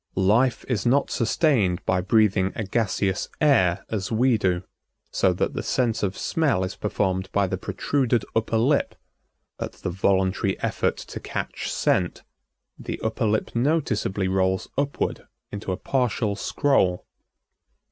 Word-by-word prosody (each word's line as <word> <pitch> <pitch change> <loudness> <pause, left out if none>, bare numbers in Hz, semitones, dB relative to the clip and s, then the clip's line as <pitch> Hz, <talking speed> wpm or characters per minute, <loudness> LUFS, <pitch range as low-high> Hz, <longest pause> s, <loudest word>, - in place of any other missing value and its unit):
Life 110 +7 +2
is 115 -7 -1
not 135 +4 +2
sustained 115 - +1
by 90 0 +1
breathing 100 -1 +2
a 110 - -2
gaseous 100 -2 -1
air 115 - +3
as 100 -2 -2
we 120 +2 +3
do, 95 -4 0 0.5
so - - +3
that - - -1
the - - -3
sense 120 -3 0
of 100 -1 -1
smell 145 - +1
is 95 - -4
performed 95 -2 -1
by 100 -1 +2
the 95 -1 -3
protruded 120 +5 0
upper 115 0 +1
lip. 135 +6 +2 0.6
At - - -4
the 95 - -5
voluntary 95 +1 +1
effort - - 0
to - - -8
catch - - -4
scent 90 -2 0 0.6
the - - -5
upper 110 - 0
lip 110 +2 -1
noticeably 115 -8 0
rolls 95 0 0
upward 140 0 -2 0.2
into 100 -1 -4
a 90 - -2
partial 125 -5 0
scroll. 100 -7 +1
105 Hz, 140 wpm, -24 LUFS, 95-120 Hz, 0.6 s, air